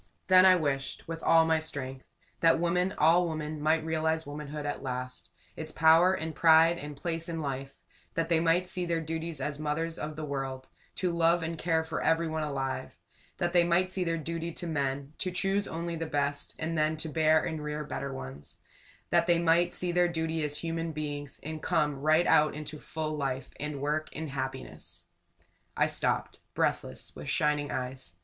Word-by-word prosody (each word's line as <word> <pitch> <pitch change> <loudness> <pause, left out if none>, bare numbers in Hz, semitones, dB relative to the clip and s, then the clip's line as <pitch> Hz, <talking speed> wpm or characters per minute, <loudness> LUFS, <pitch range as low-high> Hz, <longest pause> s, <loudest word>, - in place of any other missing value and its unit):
Then 185 0 +8
I 185 - +8
wished 135 -5 -2
with 165 0 -5
all 165 0 +5
my 160 0 +3
strength 135 -4 -5 0.3
that 165 0 +4
women, 180 +2 +1
all 170 +3 +4
women, 155 -1 -4
might 155 +1 +2
realize 160 0 0
Womanhood 145 0 -6
at 145 - -3
last; 125 -9 -5 0.3
its 155 -1 -5
power 165 +4 +5
and 160 -1 -4
pride 165 +2 +5
and 145 -1 -7
place 165 +2 -3
in 165 -1 -3
life; 135 -2 -4 0.4
that 165 0 0
they 165 -1 +3
might 170 +2 +3
see 180 0 -1
their 170 -1 +1
duty 160 +1 -3
as 145 -2 -3
mothers 160 +2 -2
of 150 0 -4
the 155 0 -4
world 135 -2 -4 0.3
to 180 -2 0
love 170 0 +3
and 165 +1 -2
care 160 0 +1
for 160 0 -4
everyone 160 -1 +1
alive; 135 -3 -3 0.4
that 175 0 -1
they 175 -1 +6
might 175 +2 +2
see 185 -1 -1
their 165 -1 0
dirty 165 +1 -4
to 175 - -6
men 140 -2 -2
to 185 - 0
choose 195 +2 0
only 170 +1 -4
the 165 0 -3
best, 145 -1 -1
and 165 +1 -2
then 155 0 +1
to 160 - -3
bear 155 0 +3
and 160 -2 -3
rear 150 0 -3
better 140 -1 -4
ones; 70 - -9 0.5
that 170 0 +4
they 175 -1 +5
might 170 +1 +3
see 180 -1 -1
their 175 0 +3
duty 160 -1 -1
as 150 0 -2
human 165 0 -3
beings, 145 -2 -5
and 155 +1 -5
come 150 -2 +1
right 155 +3 +4
out 150 -1 +4
into 150 0 -7
full 155 +1 -4
life 135 -3 -3
and 150 -1 -4
work 150 +2 -1
and 160 -3 -5
happiness! 130 0 -6 0.7
I - - +4
stopped, - - -1 0.2
breathless, 65 - -1
with - - -7
shining 150 -1 +1
eyes. 125 -9 -5
160 Hz, 190 wpm, -29 LUFS, 145-165 Hz, 0.7 s, Then